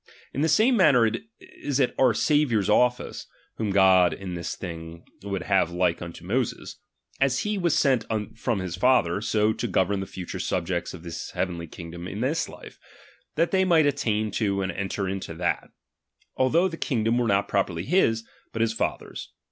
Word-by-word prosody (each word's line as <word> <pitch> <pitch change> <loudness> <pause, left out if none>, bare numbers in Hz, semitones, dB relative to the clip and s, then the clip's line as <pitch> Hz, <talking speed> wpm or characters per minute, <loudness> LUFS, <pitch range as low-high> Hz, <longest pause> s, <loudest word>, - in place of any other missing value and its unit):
In 140 - -2
the 160 - +2
same 220 - +4
manner 125 - +5 0.3
is 370 - -4
it 130 - +2
our 125 -4 +4
Saviours 125 - +2
office, 125 +3 +1 0.3
(whom 110 -2 -1
God 95 -2 +5
in 95 -2 -6
this 85 -1 -4
thing 85 -2 -8 0.2
would 100 -3 -3
have 95 -3 +2
like 90 -1 0
unto 85 0 -8
Moses), 120 +5 -2 0.4
as 135 -1 +2
he 210 0 -1
was 175 -5 +1
sent 130 -6 +2 0.3
from 115 -2 -1
his 90 -2 -4
Father, 100 -4 +2
so 110 0 +2
to 120 - -3
govern 95 0 +1
the 95 - -4
future 90 -2 -6
subjects 90 0 -2
of 85 - -12
his 85 -1 -6
heavenly 85 -2 -2
kingdom 85 +2 -8
in 100 - -6
this 145 +6 0
life, - - -12 0.6
that 165 +2 +1
they 190 -1 +3
might 170 -4 +4
attain 110 -7 0
to 100 -2 0
and 95 - -2
enter 95 +1 -3
into 95 -3 -4
that; 85 +1 -1 0.7
although 160 +8 +3
the 165 -3 -6
kingdom 115 -5 0
were 120 - +1
not 100 -1 +2
properly 95 -4 -1
his, 115 -10 +2 0.3
but 115 - -3
his 115 -1 0
Father's. 115 - -4
105 Hz, 180 wpm, -25 LUFS, 90-130 Hz, 0.7 s, manner